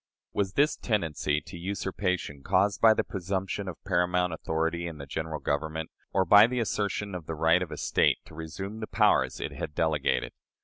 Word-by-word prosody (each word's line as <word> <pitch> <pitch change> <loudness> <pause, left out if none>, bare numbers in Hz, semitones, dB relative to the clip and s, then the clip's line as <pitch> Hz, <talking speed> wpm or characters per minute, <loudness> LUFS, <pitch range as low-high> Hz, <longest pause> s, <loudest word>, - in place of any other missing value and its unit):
Was 100 -1 -1
this 145 +5 +3
tendency 80 - 0
to 85 +3 -10
usurpation 90 -5 -2
caused 100 +8 +2
by 110 -1 +7
the - - +1
presumption 95 +1 -3
of 90 - -5
paramount 90 -1 +1
authority 80 +2 -1
in 80 -2 -7
the 70 - -7
General 80 +2 -4
Government, 80 +3 -2 0.2
or 95 -1 +2
by 105 +5 +8
the 125 +1 -2
assertion 105 -2 -1
of 90 -4 -6
the 80 - -3
right 80 +3 +3
of 90 - -3
a - - -5
State - - +2
to - - -15
resume 90 +7 -6
the 110 - -5
powers - - +2
it - - -3
had 75 - -6
delegated? 80 -3 0
90 Hz, 185 wpm, -28 LUFS, 80-100 Hz, 0.2 s, by